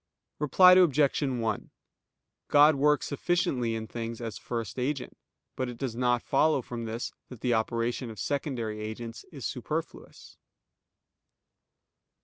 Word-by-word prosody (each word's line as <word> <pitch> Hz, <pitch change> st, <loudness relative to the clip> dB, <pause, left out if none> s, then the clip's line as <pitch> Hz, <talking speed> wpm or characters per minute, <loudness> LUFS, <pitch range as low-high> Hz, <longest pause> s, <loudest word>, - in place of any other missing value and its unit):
Reply 180 Hz, +5 st, +6 dB
Obj. 155 Hz, -7 st, +4 dB
1: 120 Hz, -6 st, -1 dB, 0.8 s
God 150 Hz, +1 st, +6 dB
works 150 Hz, +1 st, +3 dB
sufficiently 140 Hz, -7 st, 0 dB
in 110 Hz, 0 st, -4 dB
things 115 Hz, 0 st, -5 dB
as 115 Hz, -2 st, -5 dB
First 115 Hz, -1 st, -4 dB
Agent, 135 Hz, +1 st, -2 dB, 0.4 s
but 130 Hz, -1 st, -2 dB
it 120 Hz, -, -8 dB
does 130 Hz, -4 st, -3 dB
not 125 Hz, -1 st, +1 dB
follow 140 Hz, -1 st, +2 dB
from 115 Hz, -1 st, -6 dB
this 115 Hz, +2 st, -4 dB, 0.2 s
that 125 Hz, -4 st, -11 dB
the 125 Hz, -, +1 dB
operation 115 Hz, +2 st, -1 dB
of 110 Hz, -, -9 dB
secondary 125 Hz, -7 st, -2 dB
agents 115 Hz, +2 st, -6 dB
is 140 Hz, -7 st, -8 dB
superfluous. 155 Hz, +6 st, -5 dB
125 Hz, 125 wpm, -28 LUFS, 115-145 Hz, 0.8 s, Reply